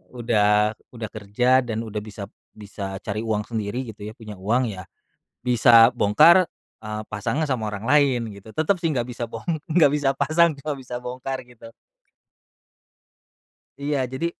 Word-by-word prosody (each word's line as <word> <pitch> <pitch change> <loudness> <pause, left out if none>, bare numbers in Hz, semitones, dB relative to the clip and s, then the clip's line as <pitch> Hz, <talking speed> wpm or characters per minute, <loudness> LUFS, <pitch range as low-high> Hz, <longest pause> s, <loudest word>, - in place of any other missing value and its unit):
udah 105 -3 +2 0.2
udah 110 -2 -5
kerja 115 +5 +2
dan 115 -2 -3
udah 110 -2 -6
bisap 105 -1 -9 0.3
bisa 100 -2 -7
cari 105 0 -3
uang 110 -2 -1
sendiri, 110 +2 -3
gitu 105 - -22
ya, 110 - -9
punya 105 -5 -10
uang 115 +7 +1
ya, 95 -3 -7 0.6
bisa 120 -1 +6
bongkar, 155 - +5 0.3
eee, 110 0 -5
pasangnya 110 +9 -1
sama 120 -4 -1
orang 100 -1 -6
lain, 130 -4 +2
gitu. 100 +1 -13
Tetep 165 +5 +1
sih, 170 - 0
enggak 120 -2 0
bisa 120 0 -4
bong - - -8 0.2
enggak 160 -3 +5
bisa 145 -2 +1
pasang, 155 +4 +3
cuma 150 +2 -4
bisa 125 -1 -7
bongkar 130 +2 -5
gitu. 115 -2 -15 2.1
Iya, 145 0 -1
jadi 130 +6 -2
115 Hz, 155 wpm, -23 LUFS, 105-135 Hz, 2.1 s, bisa